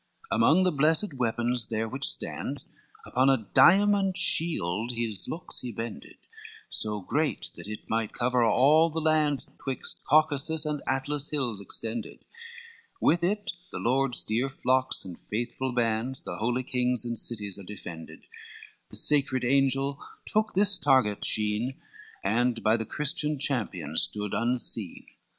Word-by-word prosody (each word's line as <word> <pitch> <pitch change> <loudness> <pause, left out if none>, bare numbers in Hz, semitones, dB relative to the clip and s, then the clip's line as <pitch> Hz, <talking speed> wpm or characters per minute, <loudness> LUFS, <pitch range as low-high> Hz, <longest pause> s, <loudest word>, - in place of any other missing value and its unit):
LXXXII - - +2
Among 185 +4 +4
the 185 - +3
blessed 155 +5 +2
weapons 120 -1 0
there 110 0 -2
which 135 +5 -3
stands - - -4 0.4
Upon 130 +2 +2
a 130 -6 +1
diamond 195 +5 +5
shield 125 - +1
his 115 -5 -2
looks 165 - -3
he 125 - -5
bended, 115 -8 -7 0.5
So 105 -1 0
great 150 +10 -2
that - - -10
it 105 0 -8
might 110 -1 -1
cover 125 0 +1
all 150 +8 +5
the 160 +1 -3
lands, 155 -3 +1
Twixt 135 -2 -4
Caucasus 155 +1 +2
and 150 -1 -2
Atlas 140 +2 -1
hills 125 -9 -1
extended; 110 +3 -4 0.7
With 170 +1 +2
it 205 +4 0 0.2
the - - -5
lord's 130 +1 0
dear 120 +5 -1
flocks 130 -2 0
and 90 -3 -9
faithful 120 +4 -3
bands, 120 +2 -1
The - - -6
holy 120 +3 -1
kings 125 -1 0
and 120 0 -3
cities 105 -3 -2
are - - -9
defended, 85 -4 -10 0.7
The - - -6
sacred 135 -4 +3
angel 135 +1 +1 0.2
took 215 -1 0
this 200 -1 +5
target 130 -9 +2
sheen, 110 +4 -1 0.4
And 115 +3 +1
by 110 +1 +4
the 110 -2 -3
Christian 150 0 -1
champion 105 - -2
stood 105 +2 +1
unseen. 115 -5 -1
125 Hz, 145 wpm, -27 LUFS, 110-150 Hz, 0.7 s, diamond